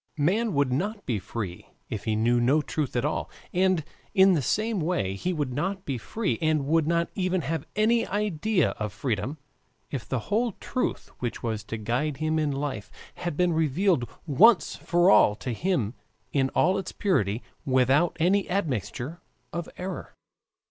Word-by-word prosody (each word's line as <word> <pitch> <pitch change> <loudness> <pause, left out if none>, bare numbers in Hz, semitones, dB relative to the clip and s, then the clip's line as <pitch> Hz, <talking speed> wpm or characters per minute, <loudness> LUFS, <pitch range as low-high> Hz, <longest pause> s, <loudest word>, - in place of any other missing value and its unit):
Man 195 +7 +1
would 140 -3 +2
not 205 - -2
be 115 -6 0
free 95 -2 -6 0.2
if 110 - -5
he 110 -1 +1
knew 120 +3 +3
no 140 +6 +3
truth 150 -3 -3
at - - +1
all, - - -1 0.2
and 185 -2 +2 0.3
in 190 -1 +7
the 160 - +2
same 215 - 0
way 155 - 0
he 175 - -2
would 145 -7 -2
not 190 +7 -2
be 135 -4 -2
free 215 - -2
and 155 -3 +2
would 160 +1 +2
not 170 0 +1
even 185 -1 0
have 155 +1 -3
any 230 +2 +3
idea 205 -2 +1
of 105 -2 -3
freedom 115 +5 -2 0.5
if 135 -5 -5
the 130 - 0
whole 220 - 0
truth 255 - -3
which 120 -2 -4
was 110 -3 -2
to 115 - -4
guide 125 +7 -1
him 155 +1 0
in 155 -1 +1
life 135 -7 -4 0.2
had 175 -4 -4
been 180 -1 +3
revealed 160 -2 +2 0.2
once 185 - +5
for 175 +2 +3
all 105 - +6
to 125 +2 -4
him 130 - 0 0.4
in 135 -2 +2
all 185 +3 +3
its 185 - -5
purity 120 - 0 0.2
without 135 +5 +3
any 190 +4 +2
admixture 145 - -2 0.3
of 170 -1 -4
error. 185 +1 -6
155 Hz, 170 wpm, -27 LUFS, 125-185 Hz, 0.5 s, in